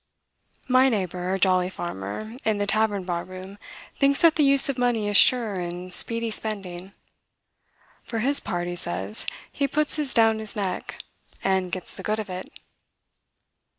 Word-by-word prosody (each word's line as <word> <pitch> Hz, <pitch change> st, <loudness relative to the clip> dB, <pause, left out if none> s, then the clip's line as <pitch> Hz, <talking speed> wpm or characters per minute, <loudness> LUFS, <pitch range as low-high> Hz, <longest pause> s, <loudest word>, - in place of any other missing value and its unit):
My 255 Hz, +1 st, +4 dB
neighbor, 185 Hz, -4 st, -3 dB
a 190 Hz, -, 0 dB
jolly 185 Hz, -1 st, +2 dB
farmer, 175 Hz, -, -7 dB
in 220 Hz, -1 st, 0 dB
the 205 Hz, -, -1 dB
tavern 205 Hz, -1 st, +1 dB
bar 175 Hz, -1 st, -3 dB
room, 185 Hz, +2 st, -11 dB, 0.4 s
thinks 275 Hz, 0 st, +2 dB
that 330 Hz, -2 st, +6 dB
the 300 Hz, -, +2 dB
use 275 Hz, -1 st, +5 dB
of 270 Hz, -2 st, -3 dB
money 240 Hz, -4 st, 0 dB
is 205 Hz, -, -3 dB
sure 235 Hz, -1 st, +4 dB
and 180 Hz, 0 st, -6 dB
speedy 230 Hz, +2 st, +4 dB
spending. 195 Hz, -4 st, -3 dB, 1.1 s
"For 230 Hz, -, -6 dB
his 275 Hz, +6 st, +5 dB
part," 175 Hz, 0 st, -4 dB
he 175 Hz, -, -4 dB
says, 175 Hz, +5 st, 0 dB, 0.2 s
"he 280 Hz, -, -1 dB
puts 300 Hz, +3 st, 0 dB
his 295 Hz, -4 st, -2 dB
down 225 Hz, -1 st, +3 dB
his 215 Hz, -1 st, -2 dB
neck, 195 Hz, -4 st, -5 dB, 0.4 s
and 190 Hz, -2 st, 0 dB
gets 185 Hz, 0 st, 0 dB
the -, -, -8 dB
good 215 Hz, +1 st, -2 dB
of 210 Hz, -3 st, -6 dB
it." 185 Hz, +1 st, -7 dB
205 Hz, 165 wpm, -24 LUFS, 185-230 Hz, 1.1 s, that